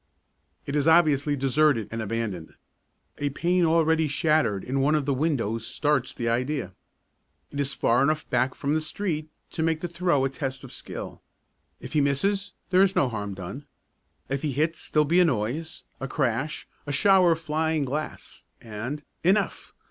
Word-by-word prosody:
It 140 Hz, -, -3 dB
is 145 Hz, +1 st, +2 dB
obviously 150 Hz, -3 st, +4 dB
deserted 135 Hz, -3 st, +2 dB
and 115 Hz, 0 st, -3 dB
abandoned. 105 Hz, -6 st, -4 dB, 0.6 s
A 145 Hz, -, 0 dB
pane 175 Hz, +5 st, +1 dB
already 160 Hz, -1 st, +3 dB
shattered 145 Hz, -, +1 dB
in 135 Hz, +2 st, -1 dB
one 145 Hz, +3 st, +3 dB
of 150 Hz, -3 st, 0 dB
the 140 Hz, -, +1 dB
windows 120 Hz, -6 st, -1 dB
starts 145 Hz, -4 st, 0 dB
the 120 Hz, -, -4 dB
idea. 125 Hz, -3 st, -1 dB, 0.8 s
It 145 Hz, -, -5 dB
is 140 Hz, 0 st, 0 dB
far 120 Hz, -, +2 dB
enough 155 Hz, +2 st, +1 dB
back 125 Hz, +1 st, +1 dB
from 145 Hz, +1 st, -1 dB
the 155 Hz, -, +1 dB
street 155 Hz, -2 st, -3 dB, 0.2 s
to -, -, -3 dB
make 160 Hz, -1 st, +1 dB
the 175 Hz, -, -2 dB
throw 170 Hz, -5 st, +1 dB
a -, -, +1 dB
test 135 Hz, -1 st, -4 dB
of 135 Hz, -, -10 dB
skill. -, -, -7 dB, 0.6 s
If -, -, -9 dB
he 150 Hz, -, +3 dB
misses 195 Hz, +9 st, 0 dB, 0.2 s
there's 190 Hz, +1 st, +4 dB
no 135 Hz, -, +3 dB
harm 105 Hz, -3 st, -4 dB
done. 100 Hz, +10 st, -8 dB, 0.6 s
If 135 Hz, 0 st, -2 dB
he 150 Hz, -3 st, -1 dB
hits 155 Hz, +4 st, -1 dB
there'll 150 Hz, 0 st, +3 dB
be 170 Hz, +5 st, +3 dB
a 180 Hz, -, +6 dB
noise, 135 Hz, +4 st, -2 dB, 0.2 s
a 135 Hz, -, -4 dB
crash, 135 Hz, +4 st, -1 dB, 0.2 s
a -, -, -2 dB
shower 185 Hz, +2 st, +5 dB
of 160 Hz, -, -6 dB
flying 160 Hz, -1 st, 0 dB
glass 150 Hz, +4 st, -5 dB, 0.2 s
and 120 Hz, +7 st, -6 dB, 0.2 s
Enough! 195 Hz, +4 st, +1 dB
145 Hz, 170 wpm, -26 LUFS, 130-160 Hz, 0.8 s, a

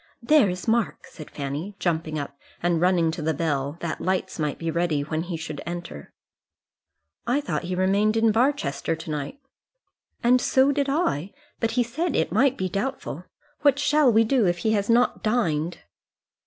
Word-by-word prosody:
"There 285 Hz, -4 st, +5 dB
is 180 Hz, +3 st, -5 dB
Mark," 230 Hz, -1 st, 0 dB
said 155 Hz, -, -11 dB
Fanny, 145 Hz, +8 st, -5 dB
jumping 160 Hz, -3 st, -1 dB
up 140 Hz, -1 st, -5 dB, 0.3 s
and 175 Hz, -2 st, +1 dB
running 175 Hz, -3 st, +3 dB
to 160 Hz, -, -6 dB
the 155 Hz, 0 st, 0 dB
bell, 145 Hz, -1 st, -1 dB
that 165 Hz, -3 st, -4 dB
lights 185 Hz, -2 st, -1 dB
might 150 Hz, -2 st, -1 dB
be 165 Hz, -1 st, -3 dB
ready 170 Hz, -3 st, 0 dB
when 155 Hz, +2 st, -2 dB
he 170 Hz, 0 st, -4 dB
should 155 Hz, -2 st, -6 dB
enter. 175 Hz, 0 st, -7 dB, 1.2 s
"I 250 Hz, +4 st, +2 dB
thought 290 Hz, -10 st, -3 dB
he 180 Hz, +1 st, -2 dB
remained 200 Hz, +4 st, +2 dB
in 225 Hz, 0 st, +4 dB
Barchester 220 Hz, -, 0 dB
to 160 Hz, 0 st, -7 dB
night." 150 Hz, -, -4 dB, 0.9 s
"And 250 Hz, +1 st, +4 dB
so 265 Hz, +2 st, +3 dB
did 285 Hz, 0 st, 0 dB
I; 205 Hz, -, 0 dB, 0.3 s
but 225 Hz, -1 st, 0 dB
he 245 Hz, -, +5 dB
said 295 Hz, +10 st, -2 dB
it -, -, +1 dB
might 275 Hz, -1 st, +3 dB
be 190 Hz, -, -1 dB
doubtful. 195 Hz, -, -4 dB, 0.4 s
What 285 Hz, -2 st, +4 dB
shall 295 Hz, -2 st, +4 dB
we 225 Hz, 0 st, +5 dB
do 225 Hz, -2 st, +2 dB
if 175 Hz, 0 st, +1 dB
he 220 Hz, -, +3 dB
has 205 Hz, -1 st, 0 dB
not 240 Hz, +2 st, +3 dB
dined?" 175 Hz, -8 st, 0 dB
185 Hz, 180 wpm, -25 LUFS, 160-240 Hz, 1.2 s, There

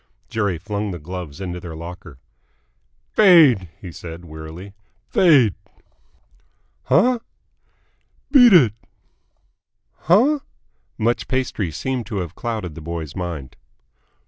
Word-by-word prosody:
Jerry 100 Hz, -5 st, -1 dB
flung 105 Hz, +4 st, -4 dB
the 90 Hz, -, -5 dB
gloves 85 Hz, -2 st, -8 dB
into 90 Hz, -2 st, -5 dB
their 85 Hz, -2 st, -8 dB
locker. 85 Hz, -2 st, -10 dB, 0.9 s
"Fade!" 155 Hz, -, +6 dB
he 90 Hz, -, -9 dB
said 85 Hz, +1 st, -9 dB
wearily. 80 Hz, +5 st, -10 dB, 0.3 s
"Fade!" 130 Hz, -, +4 dB, 1.3 s
"Huh?" 250 Hz, 0 st, +3 dB, 1.1 s
"Beat 245 Hz, -5 st, +8 dB
it!" 130 Hz, -, +6 dB, 1.2 s
"Huh?" 245 Hz, -, +3 dB, 0.6 s
Much 120 Hz, +2 st, 0 dB
pastry 130 Hz, -8 st, -1 dB
seemed 120 Hz, -, -4 dB
to 110 Hz, -, -4 dB
have 90 Hz, -3 st, -4 dB
clouded 110 Hz, -7 st, -4 dB
the 80 Hz, -, -10 dB
boy's 80 Hz, -2 st, -6 dB
mind. 85 Hz, -8 st, -5 dB
95 Hz, 105 wpm, -21 LUFS, 85-125 Hz, 1.3 s, Beat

